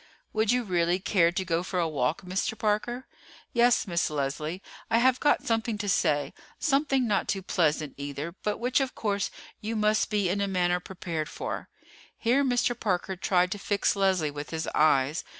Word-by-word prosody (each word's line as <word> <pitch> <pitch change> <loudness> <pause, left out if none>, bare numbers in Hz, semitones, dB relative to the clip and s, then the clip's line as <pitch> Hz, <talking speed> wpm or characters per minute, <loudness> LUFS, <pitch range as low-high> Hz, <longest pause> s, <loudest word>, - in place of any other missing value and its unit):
"Would 220 0 +2
you 250 0 +2
really 175 -3 +1
care 185 -3 +2
to 185 +2 -2
go 165 -1 0
for 180 +1 -4
a 170 -2 +2
walk, 150 +3 -1
Mr. 185 +4 -2
Parker?" 225 +4 -1 0.5
"Yes, 240 0 +4
Miss 170 -4 0
Leslie. 150 +5 -3 0.3
I 230 - +3
have 255 +1 +4
got 290 -1 +2
something 225 -3 0
to 205 0 -4
say, 145 -6 +1 0.2
something 275 -4 +1
not 205 -2 +1
too 195 -1 -1
pleasant 155 -5 0
either, 140 +3 -5
but 210 -1 -1
which 245 +2 +1
of 265 -1 -2
course 205 -2 -1 0.3
you 220 +2 -4
must 215 0 +2
be 205 -3 +1
in 195 +3 0
a 200 - +1
manner 180 -2 +1
prepared 170 -4 -5
for." - - -5 0.5
Here 255 +4 +2
Mr. 245 -2 +2
Parker 190 -2 -1
tried 180 0 +1
to 205 - -3
fix 200 +1 +1
Leslie 190 -6 +2
with 145 +1 -7
his 160 -1 -3
eyes. 150 0 +3
195 Hz, 185 wpm, -28 LUFS, 170-225 Hz, 0.5 s, Yes